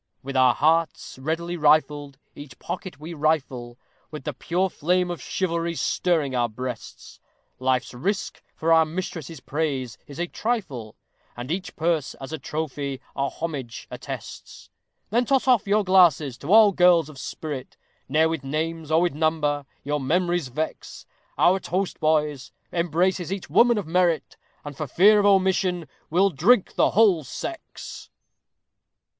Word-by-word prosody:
With 135 +1 -6
our 130 -2 +5
hearts 160 -3 +1
ready 165 +5 -2
rifled, 145 -2 +2 0.2
each 145 -4 -11
pocket 180 -4 -6
we 160 +3 -7
rifle, 135 -6 -1 0.3
With 150 -3 -8
the - - -3
pure 180 +3 0
flame 180 +1 0
of 175 - -6
chivalry 170 -2 -2
stirring 155 -6 0
our 120 -1 +1
breasts; 125 +1 -7 0.4
Life's 130 -1 0
risk 195 +11 -3
for 165 +1 +2
our 160 0 +6
mistress's 165 -2 -5
praise 135 -7 -3
is 140 - -10
a 175 - -1
trifle; 175 - -3 0.4
And 125 +4 -5
each 180 +1 -4
purse 160 -3 0
as 135 +3 -9
a 160 - -4
trophy 140 -2 -4 0.2
our 140 0 0
homage 140 -8 -6
attests. - - -8 0.4
Then 240 +3 +3
toss 265 +1 +1
off 245 -6 +4
your 210 +1 +3
glasses 170 -8 +4
to 145 - -5
all 215 -1 +8
girls 175 -4 +4
of 150 -4 -12
spirit, 145 -2 -6 0.3
Ne'er 155 +3 +4
with 160 -3 -3
names, 160 +3 -3
or 160 +1 +4
with 175 -3 +1
number, 150 -2 0 0.2
your 145 +1 -1
memories 175 +2 0
vex; 155 +6 -5 0.3
Our 185 +2 +4
toast, 185 +1 -2
boys, 150 -4 0 0.2
embraces 175 +1 0
each 195 -2 -5
woman 240 -1 +5
of 205 - -2
merit, 170 0 +1 0.3
And, 145 -1 -7
for 155 +1 -4
fear 205 +10 +5
of 205 - +3
omission, 185 -3 +2 0.2
we'll 190 +4 +3
drink 190 - +3
the - - +3
WHOLE 195 -7 +4
SEX. 330 - -8
160 Hz, 150 wpm, -24 LUFS, 140-180 Hz, 0.4 s, all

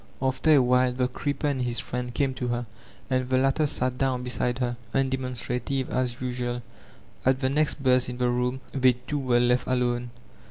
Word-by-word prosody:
After 130 +4 0
a 140 - +6
while 125 0 +3
the 125 0 0
creeper 140 +3 -3
and 140 -3 0
his 120 -1 +1
friend 125 0 -4
came 135 +1 0
to 125 -1 -3
her, 120 0 -1 0.4
and 130 -1 0
the 130 - +3
latter 135 +3 +2
sat 130 -3 0
down 130 -2 0
beside 125 0 -1
her, 120 -2 -1 0.2
undemonstrative 130 0 -1
as 125 -1 -1
usual 125 -1 -3 0.6
At 130 0 +3
the 130 -1 +1
next 150 0 +1
buzz 125 -1 +3
in 125 - -5
the 125 -1 +1
room 125 +1 -1
they 130 -2 +4
two 145 +4 -4
were 125 -3 +2
left 125 +1 +2
akme. 125 -1 0
125 Hz, 190 wpm, -26 LUFS, 125-130 Hz, 0.6 s, a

